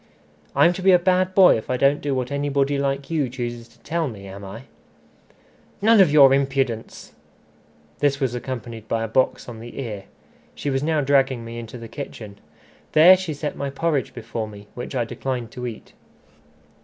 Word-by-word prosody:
"I'm 145 +5 +5
to 185 - -6
be 190 +1 +5
a - - +8
bad 185 +1 +1
boy 190 -9 +7
if 110 - -8
I 130 - 0
don't 140 +3 +3
do 140 -2 -1
what 130 +1 -3
anybody 140 0 0
like 140 +1 -2
you 150 -6 0
chooses 120 -2 -5
to - - -25
tell 165 0 -2
me, 105 -6 -9
am 100 +1 -9
I?" 100 +5 -9 1.2
"None 220 0 +5
of 175 -6 +5
your 140 -3 +7
impudence!" 135 -4 -2 0.9
This 140 -1 +1
was 130 -4 0
accompanied 120 -3 -6
by 115 0 -1
a - - -2
box 130 +4 0
on 115 -2 -8
the 120 +4 -9
ear. 105 -7 -5 0.5
She 145 - -3
was 135 0 0
now 155 0 +1
dragging 135 -3 +2
me 115 +1 -7
into 115 +1 -8
the 115 -1 -9
kitchen. 110 -7 -8 0.5
There 170 +4 +8
she 180 -5 -4
set 150 +1 -4
my 140 0 -3
porridge 145 0 -1
before 115 -1 -5
me, 105 -1 -12
which 125 +2 -7
I 120 -2 0
declined 120 -1 -4
to 125 0 -5
eat. 115 -3 -9
135 Hz, 190 wpm, -22 LUFS, 115-145 Hz, 1.2 s, a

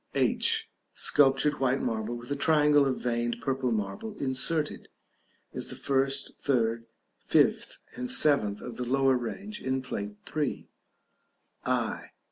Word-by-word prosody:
h. 445 -1 +2 0.3
Sculptured 145 +1 +3
white 135 0 +1
marble 110 +1 -2
with 120 +2 -8
a - - +1
triangle 150 -1 +4
of 130 - -1
veined 120 -1 -1
purple 130 +1 -1
marble 110 - -3
inserted 145 +4 -1 0.6
(as - - -1
the - - -5
first, 135 0 +1
third, 115 -4 0 0.3
fifth, - - +2 0.2
and 125 0 -3
seventh 105 -9 +3
of 120 - -7
the 125 - -2
lower 135 0 +3
range 195 - -5
in 130 0 -1
Plate 105 -5 -5 0.2
III.). 150 -3 -2 1.0
i. - - 0
135 Hz, 130 wpm, -28 LUFS, 120-145 Hz, 1.0 s, triangle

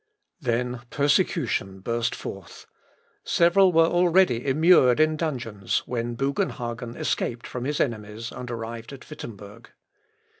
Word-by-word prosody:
" - - -50
Then 125 +1 -1
persecution 140 - 0
burst 115 +4 -1
forth. - - -9 0.6
Several 180 +2 +4
were 165 -1 +5
already 175 -7 +3
immured 140 -3 +5
in 155 0 +3
dungeons, 120 - -2
when 120 -1 -3
Bugenhagen 120 -3 -3
escaped 120 0 -2
from 125 -1 -5
his 145 +2 -1
enemies, 110 -1 -3
and 125 - -7
arrived 115 +1 -6
at 135 - -12
Wittemberg. 110 -5 -10
125 Hz, 120 wpm, -25 LUFS, 115-155 Hz, 0.6 s, were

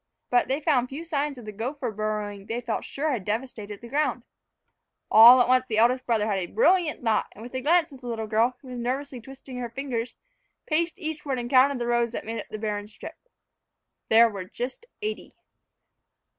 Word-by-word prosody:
But 245 0 +3
they 270 +2 0
found 265 -5 +1
few 300 +5 -7
signs 295 -3 -2
of 240 - -10
the 215 - -6
gopher 245 +4 -4
burrowing 210 -1 -4
they 230 +2 -2
felt 235 -2 -3
sure 305 +2 -2
had 235 -8 -2
devastated 210 -1 -4
the 235 - -9
ground. 295 +5 -1 0.9
All 235 +4 +10
at 245 - +4
once 255 0 +3
the 220 - -2
eldest 250 +3 +3
brother 225 -3 +2
had 205 -3 0
a 175 - -3
brilliant 365 - +2
thought, 225 -2 +1
and, 220 - -12
with 245 - -10
a 260 - -3
glance 325 +2 +2
at 265 - -13
the 245 - -8
little 225 -2 -3
girl, 225 +3 +1
who 260 - -11
was 250 -1 -6
nervously 255 +1 -3
twisting 265 +1 -10
her 240 -1 -4
fingers, 245 -1 -4 0.5
paced 335 +3 0
eastward 310 -6 -4
and 240 0 -5
counted 270 +1 +5
the 240 - -3
rows 240 -1 +1
that - - -5
made 225 +1 -4
up - - -13
the 215 - -5
barren 210 -1 -3
strip. 210 - -10 1.0
There 230 +1 +7
were 200 -4 -6
just 250 - -6 0.2
eighty! 430 +1 -5
245 Hz, 205 wpm, -26 LUFS, 220-275 Hz, 1.0 s, All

